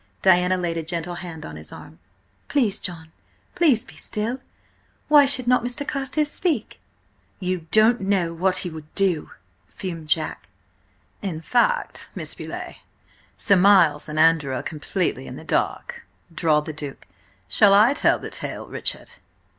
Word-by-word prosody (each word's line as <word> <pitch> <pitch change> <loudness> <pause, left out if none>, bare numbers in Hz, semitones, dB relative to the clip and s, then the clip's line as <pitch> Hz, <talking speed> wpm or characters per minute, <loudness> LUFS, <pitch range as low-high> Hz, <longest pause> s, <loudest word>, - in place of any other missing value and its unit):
Diana 185 0 +4
laid 170 -2 -2
a - - -1
gentle 170 +1 -4
hand 175 -2 -8
on 80 0 -8
his 80 0 -11
arm. 80 +1 -12 0.5
"Please, 235 -9 +1
John! 165 -4 -5 0.4
Please 265 -9 +3
be - - -15
still! 230 +4 -3 0.7
Why 290 -2 +7
should 255 -2 +2
not 250 -1 +3
Mr. 245 +4 -3
Carstares 290 +2 -1
speak?" 310 - -2 0.6
"You 180 -3 -3
don't 220 +1 +5
know 190 -4 0
what 185 +2 +1
he - - -2
would 155 -1 -10
do!" 190 -6 +1 0.4
fumed 165 -5 -7
Jack. 155 0 -1 0.7
"In 185 -6 -4
fact, 485 - 0
Miss - - -4
Beauleigh, - - -7 0.6
Sir 200 - +4
Miles 180 -7 +4
and 150 - -5
Andrew 155 -4 +3
are 125 - -4
completely 155 -2 -3
in - - -8
the - - -10
dark," - - -2 0.3
drawled 155 -2 +1
the 155 - -5
Duke. 145 -2 -8 0.4
"Shall 200 - +5
I 220 +6 +6
tell 290 - +3
the - - -8
tale, - - -5
Richard?" - - -3
180 Hz, 155 wpm, -23 LUFS, 160-225 Hz, 0.7 s, Why